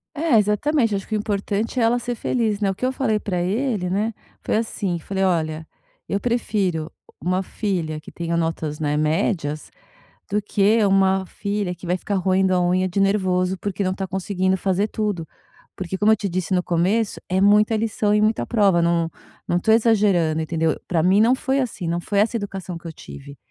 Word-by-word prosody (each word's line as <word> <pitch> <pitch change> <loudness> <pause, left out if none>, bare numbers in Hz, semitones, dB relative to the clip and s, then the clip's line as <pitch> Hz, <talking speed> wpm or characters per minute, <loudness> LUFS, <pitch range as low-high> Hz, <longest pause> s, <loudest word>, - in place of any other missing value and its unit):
É 310 -4 +2
exatamente, 225 +4 +1
acho 195 -1 -3
que - - -4
o - - +2
importante 210 +3 -2
é 235 - +3
ela 235 +2 +3
ser 240 0 -3
feliz, 220 -3 0
né. 200 -2 +1
O - - -2
que 205 - -5
eu 255 - +2
falei 220 -5 0
pra 180 -4 -2
ele, 205 +1 -1
né, 205 +5 0 0.3
foi - - 0
assim, 200 -5 -2
falei: 190 +4 -3
"Olha, 160 -3 0 0.4
eu 200 - 0
prefiro 200 -8 -1 0.3
uma 185 +2 0
filha 175 -7 -3
que - - -12
tenha 170 0 -3
notas, 160 -2 -2
né, 150 -1 0
médias, 155 -1 -1 0.6
do 205 +1 +1
que 210 +1 +2
uma 190 -1 +3
filha 200 -1 -3
que 175 +1 -11
vai 180 +1 +1
ficar 200 +2 -4
roendo 190 0 +2
a 180 - +2
unha 185 +1 +1
de 185 +2 -1
nervoso, 190 -2 +1
porque 200 +1 -3
não 185 -1 0
tá 190 0 -4
conseguindo 190 0 -1
fazer 190 +2 0
tudo." 205 -7 -2 0.5
Porque 190 0 -4
como 210 +2 +4
eu - - +4
te 200 -1 -3
disse 185 +1 -2
no 180 - +2
começo, 190 +6 0
é 185 +1 +1
muita 210 +2 +4
lição 215 -1 0
e 210 - +3
muita 215 +1 +1
prova 200 -6 +3
não 170 -1 +1 0.4
não 175 - +2
tô 220 +5 +2
exagerando, 205 -8 +3
entendeu. 160 0 0
Pra 170 -3 +1
mim 190 +4 +4
não 235 +3 +5
foi 265 +1 -1
assim, 210 -9 -3
não 170 +1 -1
foi 200 +3 -2
essa 225 +3 +1
educação 195 -4 -5
que 170 - -13
eu 165 - -6
tive. 140 -2 -11
195 Hz, 200 wpm, -22 LUFS, 175-210 Hz, 0.6 s, não